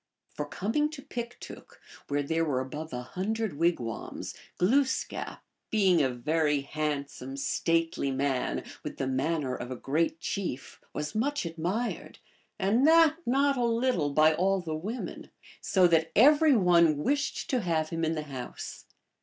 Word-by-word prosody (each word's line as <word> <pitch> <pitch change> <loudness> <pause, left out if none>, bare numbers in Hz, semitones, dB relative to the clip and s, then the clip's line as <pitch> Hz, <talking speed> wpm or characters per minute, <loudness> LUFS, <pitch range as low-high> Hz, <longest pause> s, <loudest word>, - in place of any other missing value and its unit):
For 150 - -4
coining 225 - 0
to 275 -3 -8
Piktook, 240 -1 -8 0.3
where 145 0 0
there 160 +3 0
were 140 -5 0
above 150 +5 -5
a 125 0 -4
hundred 195 - -3
wigwams, 165 -10 -2 0.2
Glooskap, 260 +8 0 0.3
being 190 -6 +4
a 135 - +2
very 150 +4 +1
handsome, 140 -2 -4
stately 165 +1 0
man, 135 -1 -1 0.2
with - - -6
the 135 - -1
manner 135 +1 -1
of 120 - -6
a 130 - -4
great 160 +6 -1
chief, 170 -9 -4
was 150 0 -4
much 280 +2 0
admired, 175 +8 -3 0.4
and 215 +8 +3
that 325 -1 +6
not 275 +2 +3
a 245 - +1
little 230 - +1
by 155 +2 +5
all 190 +4 +2
the 165 -3 -4
women, 205 +11 -5 0.3
so 185 -2 +3
that 165 -1 +2
every 295 +4 +6
one 170 -5 +4
wished 285 - -1
to 255 -3 +1
have 160 -4 0
him 165 0 -3
in 160 0 +1
the 155 - -3
house. 135 -4 -7
165 Hz, 150 wpm, -29 LUFS, 145-225 Hz, 0.4 s, that